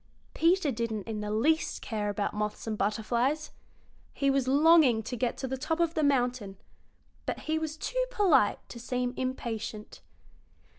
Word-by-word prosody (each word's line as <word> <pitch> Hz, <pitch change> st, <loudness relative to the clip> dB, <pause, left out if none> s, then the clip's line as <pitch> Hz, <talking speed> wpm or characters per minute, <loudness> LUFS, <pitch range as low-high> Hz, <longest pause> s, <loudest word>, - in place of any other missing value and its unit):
Peter 335 Hz, -2 st, +3 dB
didn't 225 Hz, -3 st, -3 dB
in 215 Hz, -2 st, -4 dB
the 210 Hz, -, -4 dB
least 290 Hz, +10 st, +1 dB
care 210 Hz, -3 st, -2 dB
about 205 Hz, 0 st, -2 dB
moths 210 Hz, 0 st, -3 dB
and 220 Hz, -1 st, -2 dB
butterflies. 235 Hz, +9 st, 0 dB, 0.6 s
He 275 Hz, -1 st, +2 dB
was 270 Hz, -2 st, +1 dB
longing 285 Hz, -4 st, +5 dB
to 245 Hz, -, -5 dB
get 245 Hz, 0 st, -1 dB
to 265 Hz, -, -4 dB
the 265 Hz, +1 st, -3 dB
top 320 Hz, +4 st, -1 dB
of 335 Hz, -1 st, +2 dB
the 315 Hz, -, 0 dB
mountain, 245 Hz, -8 st, 0 dB, 0.7 s
but -, -, -3 dB
he 315 Hz, 0 st, -1 dB
was 315 Hz, -1 st, -4 dB
too -, -, -1 dB
polite 390 Hz, -, +2 dB
to 235 Hz, -, -9 dB
seem 250 Hz, +1 st, -2 dB
impatient. 225 Hz, -4 st, -5 dB
250 Hz, 160 wpm, -29 LUFS, 220-310 Hz, 0.7 s, longing